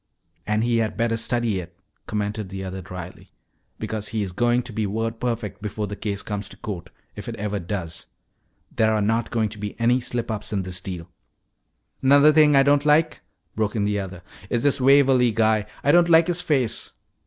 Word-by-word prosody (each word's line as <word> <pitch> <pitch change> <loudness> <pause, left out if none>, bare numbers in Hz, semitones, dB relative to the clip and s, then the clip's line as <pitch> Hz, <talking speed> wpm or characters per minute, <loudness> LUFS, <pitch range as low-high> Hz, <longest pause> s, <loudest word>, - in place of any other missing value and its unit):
"And 105 +1 +1
he 120 0 +2
had 110 -2 -1
better 115 0 +1
study 115 -3 0
it," 85 0 -10 0.3
commented 105 -1 -3
the 95 0 -6
other 95 0 -5
dryly, 90 0 -9 0.5
"because 110 -1 -4
he 110 -2 -2
is 95 - -4
going 120 +5 +1
to 115 - -8
be 110 -1 -1
word 115 +2 -3
perfect 115 -4 -3
before 105 0 -3
the 105 0 -6
case 100 -2 -4
comes 105 -1 -4
to - - -12
court, 90 -4 -6 0.3
if - - -7
it - - -5
ever 105 0 -3
does. 85 -2 -5 0.7
There 110 0 +3
are 105 - +1
not 115 +2 0
going 110 -3 0
to 105 0 -9
be 105 +2 -6
any 120 +2 +3
slip 120 -1 -3
ups 105 0 -4
in 100 -2 -1
this 90 0 -3
deal." 90 -3 -6 0.9
"'Nother 145 +3 +6
thing 150 -2 +6
I 135 - +6
don't 145 +1 +3
like," 155 +1 +3 0.3
broke 110 0 -1
in 105 -2 +1
the 105 0 0
other, 95 -2 -7 0.3
"is 120 0 0
this 145 -2 +2
Waverly 135 -2 +5
guy. 110 -1 +2 0.2
I 145 - +4
don't 175 +1 +5
like 165 0 +6
his 175 0 -2
face." 135 -9 0
110 Hz, 200 wpm, -23 LUFS, 100-120 Hz, 0.9 s, Nother